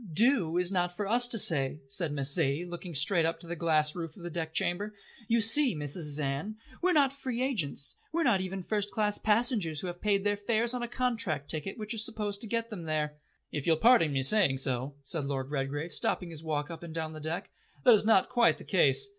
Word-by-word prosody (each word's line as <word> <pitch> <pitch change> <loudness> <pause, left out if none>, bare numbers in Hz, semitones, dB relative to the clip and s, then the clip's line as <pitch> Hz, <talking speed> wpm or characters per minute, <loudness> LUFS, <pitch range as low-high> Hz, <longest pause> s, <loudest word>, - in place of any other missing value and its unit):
"Do 210 - +3
is 180 +1 0
not 180 -2 -1
for 205 - -2
us 245 +3 +3
to 245 - +1
say," 145 -8 +1
said 150 +4 -2
Miss 140 -1 -1
Zaidie, 155 +1 0
looking 175 -1 -7
straight 170 +5 +3
up 165 +1 -1
to - - -13
the 170 +1 -5
glass 155 -2 +1
roof 165 -1 -6
of 175 - -12
the 175 - -5
deck 160 -1 -4
chamber. 205 +6 -1 0.3
"You 230 0 +3
see, 245 - +5
Mrs. 150 0 -2
Van, 150 +9 -3 0.2
we're 365 +1 +3
not 280 -5 +4
free 255 -3 -3
agents. 165 - -1
We 335 +1 0
are - - +3
not 195 -11 +3
even 190 0 -4
first 205 +1 -1
class 210 -1 0
passengers 210 - +1
who - - -4
have 175 0 -6
paid 200 -2 +1
their 205 0 +1
fares 230 +3 +1
on 250 - -3
a 240 - -2
contract 225 - -1
ticket 160 +7 -5
which 215 +1 -3
is 220 -1 0
supposed 210 -2 -3
to 225 - -6
get 230 +1 -2
them 190 -7 -7
there." 150 -1 -2 0.3
"If 150 0 -4
you'll 160 -1 +4
pardon 225 -6 +5
me 135 -1 0
saying 160 -4 +4
so," 130 +1 -1
said 145 +2 -4
Lord 135 -1 -3
Redgrave, 145 +3 -3
stopping 175 +2 -1
his 155 -2 -7
walk 150 -1 -3
up 165 - -8
and 165 -2 -9
down 160 -1 -3
the 155 - -8
deck, 160 +3 -5 0.3
"that 245 - +8
is 215 - +4
not 210 -3 +4
quite 240 -2 +3
the - - -11
case. 415 -1 +3
175 Hz, 235 wpm, -30 LUFS, 155-220 Hz, 0.3 s, that